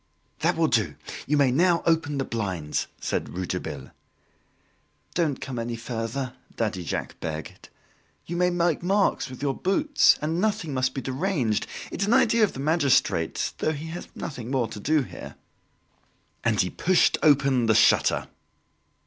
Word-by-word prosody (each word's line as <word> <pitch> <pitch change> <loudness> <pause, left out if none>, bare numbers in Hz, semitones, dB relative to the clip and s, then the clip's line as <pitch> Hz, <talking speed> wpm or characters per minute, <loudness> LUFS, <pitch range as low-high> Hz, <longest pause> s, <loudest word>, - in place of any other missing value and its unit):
"That - - +1
will - - +3
do! - - +1 0.3
you 150 - +2
may 140 -3 +4
now 170 +5 +3
open 160 -3 +1
the 135 - -1
blinds," 95 -9 -2
said - - -2
Rouletabille. 90 0 -5 1.2
"Don't 155 -6 0
come 130 -3 -5
any 115 0 -3
further," 120 +3 -4 0.2
Daddy 105 -5 -2
Jacques - - -4
begged, 80 -1 -6 0.6
"you 175 - -5
may 180 +1 +3
make 175 -3 +1
marks 195 -5 +1
with 130 +1 -9
your 140 -2 +1
boots, 285 - +3
and 160 +3 -1
nothing 210 -8 -1
must 130 0 0
be 135 - -2
deranged; 130 - -1 0.2
it's 200 - -2
an 230 - +4
idea 230 0 +4
of 210 - +2
the - - -8
magistrate's 145 -2 +1
though 155 - +1
he 155 +2 -6
has 175 +2 -7
nothing 125 -7 -6
more 130 -4 +1
to 110 - -8
do 150 +6 +2
here." - - -10 1.1
And 110 -3 +1
he 90 - +1
pushed 185 0 +3
open 135 -5 +4
the 110 - +4
shutter. 105 - +4
140 Hz, 155 wpm, -25 LUFS, 115-170 Hz, 1.2 s, may